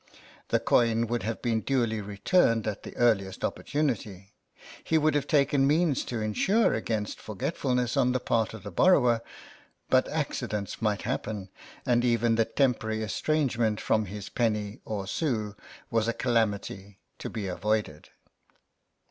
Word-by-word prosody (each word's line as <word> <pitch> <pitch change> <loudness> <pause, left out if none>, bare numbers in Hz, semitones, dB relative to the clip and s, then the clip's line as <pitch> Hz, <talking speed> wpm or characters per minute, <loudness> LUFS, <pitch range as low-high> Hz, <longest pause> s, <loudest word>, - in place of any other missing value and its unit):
The - - +2
coin 115 -1 +2
would 120 +1 -2
have 115 +1 -4
been 115 -2 +1
duly 115 -5 0
returned 115 - +2
at 105 -2 -3
the - - -10
earliest 100 -6 +1
opportunity 110 -10 -3 0.2
— - - -17
he 160 - +2
would 155 0 +3
have 145 -1 0
taken 140 -2 +3
means 155 -1 +2
to 120 - -3
insure 190 - +2
against 110 -2 -3
forgetfulness 125 - -1
on 125 - +3
the 130 - 0
part 115 -2 0
of 105 - -11
the 100 - -7
borrower 125 - +4 0.3
— - - -31
but 130 0 +4
accidents 120 -9 -3
might 105 -2 0
happen, 105 -3 -3 0.4
and 120 -2 +2
even 120 -1 +2
the 115 0 +3
temporary 110 -3 0
estrangement 115 -1 0
from 110 -1 +1
his 100 +1 -7
penny 105 -3 -1
or 100 -3 -3
sou 105 -2 -2 0.4
was 115 -1 +1
a 115 - +1
calamity 105 -5 -1 0.2
to - - -5
be 105 -3 -4
avoided. 100 -3 -2
115 Hz, 150 wpm, -28 LUFS, 105-125 Hz, 0.4 s, borrower